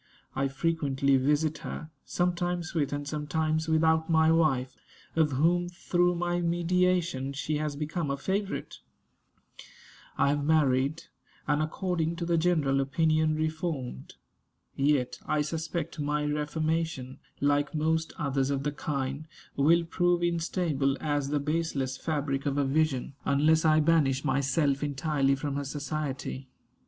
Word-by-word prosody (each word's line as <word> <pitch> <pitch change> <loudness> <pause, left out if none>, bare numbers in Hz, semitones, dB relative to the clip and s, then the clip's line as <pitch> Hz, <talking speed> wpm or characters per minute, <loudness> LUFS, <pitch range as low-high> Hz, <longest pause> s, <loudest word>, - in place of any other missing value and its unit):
I 135 +1 +1
frequently 140 -1 +1
visit 150 +3 +1
her, 160 0 -7
sometimes 175 -1 -1
with 150 -5 0
and 145 0 -4
sometimes 155 +2 -1
without 160 0 +3
my 160 -1 +4
wife, 135 -6 +2 0.4
of 155 -3 +2
whom, 175 +6 +2
through 175 0 +1
my 175 0 -1
mediation, 170 -5 +1
she 150 +2 -2
has 150 -1 -2
become 155 +1 -3
a 140 - -1
favorite. 195 +7 -3 1.4
I 140 - +3
have 145 0 0
married, 145 -1 +2 0.4
and 150 0 +2
according 165 +1 -1
to 170 0 -4
the 170 -1 +2
general 155 -6 +2
opinion 155 +2 +2
reformed. 155 - -3 0.6
Yet 140 -2 +1
I 150 - +1
suspect 160 +2 -4
my 150 0 0
reformation, 150 -2 -2 0.2
like 145 +2 +1
most 160 +1 0
others 135 -3 0
of 140 -1 -1
the 145 - 0
kind, 140 0 -3 0.3
will 165 +5 +4
prove 175 +1 +1
instable 165 -5 0
as 145 -2 -1
"the 145 0 +1
baseless 145 -3 -1
fabric 145 -2 -2
of 140 0 0
a 140 - +2
vision," 140 -2 0
unless 155 +3 +3
I 155 0 +5
banish 150 -4 +2
myself 140 0 +1
entirely 140 -1 +1
from 140 +1 -3
her 145 - -2
society. 140 -2 -4
150 Hz, 135 wpm, -28 LUFS, 140-165 Hz, 1.4 s, I